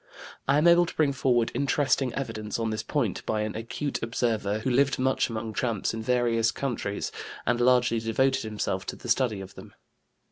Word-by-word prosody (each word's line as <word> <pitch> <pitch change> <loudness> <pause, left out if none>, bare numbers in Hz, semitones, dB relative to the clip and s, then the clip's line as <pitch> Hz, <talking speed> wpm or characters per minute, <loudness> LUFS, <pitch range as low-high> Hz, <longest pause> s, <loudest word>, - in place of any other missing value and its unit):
I 135 +2 +4
am 155 +3 +4
able 170 0 +6
to - - -8
bring 145 -3 +2
forward 125 -3 +1
interesting 140 -2 +1
evidence 110 -5 -4
on 115 -1 -1
this 110 0 -2
point 115 - -1
by 110 -1 0
an 105 0 -3
acute 130 +6 -4
observer 115 -3 0
who 115 +4 -2
lived 135 +2 +3
much 130 0 +1
among 110 -1 -4
tramps 115 -3 -1
in 110 - -4
various 115 -1 +2
countries, 115 -7 -3 0.3
and 120 +1 +1
largely 125 -2 +4
devoted 115 +4 +1
himself 105 -3 -3
to - - -3
the - - -10
study 115 -4 +1
of 95 0 -10
them. - - -13
120 Hz, 185 wpm, -27 LUFS, 110-130 Hz, 0.3 s, able